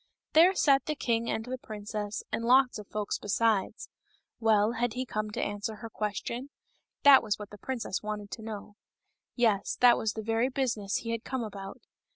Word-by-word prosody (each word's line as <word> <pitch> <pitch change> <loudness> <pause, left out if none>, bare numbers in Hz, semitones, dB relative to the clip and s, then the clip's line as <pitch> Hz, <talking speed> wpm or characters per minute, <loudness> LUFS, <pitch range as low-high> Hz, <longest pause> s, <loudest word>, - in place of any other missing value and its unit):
There 345 +5 +6
sat 275 -6 +3
the 305 - -1
king 235 -4 0
and 220 - -2
the 255 +1 -5
princess, 210 -1 -5
and 230 - -2
lots 250 0 +4
of 210 - -10
folks 210 -1 -3
besides. 210 0 0 0.5
Well, 220 -1 +3
had 240 -1 -1
he 255 +2 -3
come 215 -3 -3
to 210 - -5
answer 205 +1 -3
her 225 +1 -9
question? 225 +6 -4 0.5
That 280 -2 +9
was 210 -2 -1
what 210 -1 -9
the 210 - -11
princess 240 -6 -3
wanted 210 -1 -5
to 225 - -6
know. 210 -1 -8 0.6
Yes; 220 -5 +1
that 245 -1 +6
was 215 -2 -1
the 220 - -5
very 225 +3 +1
business 230 -7 -1
he 230 - -2
had 230 0 -3
come 260 -2 -3
about. 195 -2 -8
225 Hz, 190 wpm, -29 LUFS, 210-245 Hz, 0.6 s, That